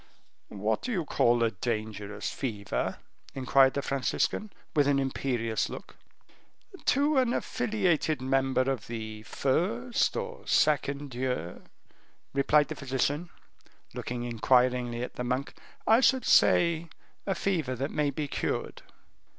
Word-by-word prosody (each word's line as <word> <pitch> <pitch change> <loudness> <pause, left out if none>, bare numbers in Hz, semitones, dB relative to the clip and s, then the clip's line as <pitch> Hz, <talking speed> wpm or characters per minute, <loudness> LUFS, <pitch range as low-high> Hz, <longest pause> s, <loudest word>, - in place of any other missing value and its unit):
"What 105 +2 0
do 250 - -4
you 180 -8 -1
call 120 -4 +3
a 115 - +2
dangerous 105 -1 -4
fever?" 105 -7 -3 0.4
inquired 135 0 +4
the 140 - -1
Franciscan, 140 +9 -1 0.2
with 145 -2 +4
an 140 -1 +3
imperious 125 -4 -1
look. - - -9 0.9
"To 285 +1 +3
an 250 -2 +2
affiliated 190 - 0
member 135 0 +1
of 130 -3 -2
the 110 -2 -6
first 210 - 0
or 475 0 -6
second 140 -2 +1
year," 125 -8 -3 0.7
replied 145 +1 +3
the - - -4
physician, 140 +5 -1 0.6
looking 120 0 -4
inquiringly 125 0 +2
at - - -7
the 125 - -2
monk, 125 +3 -2 0.3
"I 225 +1 +6
should 260 0 +3
say 170 -1 +4 0.4
a 195 - +1
fever 165 -9 -1
that 135 +4 -3
may 150 -1 +1
be 145 +1 -3
cured." - - -3
135 Hz, 125 wpm, -29 LUFS, 120-160 Hz, 0.9 s, I